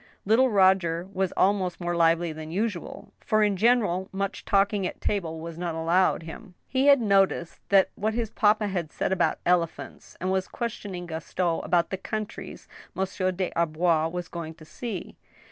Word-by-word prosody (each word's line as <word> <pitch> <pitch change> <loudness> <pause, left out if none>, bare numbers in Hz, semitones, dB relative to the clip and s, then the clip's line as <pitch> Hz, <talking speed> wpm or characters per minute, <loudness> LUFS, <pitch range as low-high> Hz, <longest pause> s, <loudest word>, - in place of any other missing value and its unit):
Little 235 +6 +4
Roger 185 -4 +3
was 190 -1 0
also 185 -2 +2
more 175 -1 -2
lively 165 0 +2
than 155 0 -8
usual, 195 0 -4
for 215 0 +2
in 205 -1 +2
general 205 -4 +2
much 195 0 -3
talking 200 -1 +2
at - - -8
table 165 -6 -2
was 165 0 -7
not 175 -2 -3
allowed 170 +2 +2
him. 180 +4 -10
He 265 +1 +1
had 280 -1 +7
noticed 195 -5 +1 0.3
what 215 +2 -2
his 230 -2 -2
papa 210 0 +3
had 175 -5 -3
said - - -2
about 190 - +1
elephants, 175 -2 -1
and 185 +1 -1
was 190 0 0
questioning 205 -6 -5
Gaston 165 +1 -2
about 170 -1 +1
the 190 - -2
countries 215 +2 -6 0.3
Monsieur 190 0 -1
des 185 0 -2
Arbois 165 0 +2
was 180 0 -4
going 165 -2 -7
to 155 - -15
see. 215 +2 -6
185 Hz, 165 wpm, -26 LUFS, 170-205 Hz, 0.3 s, had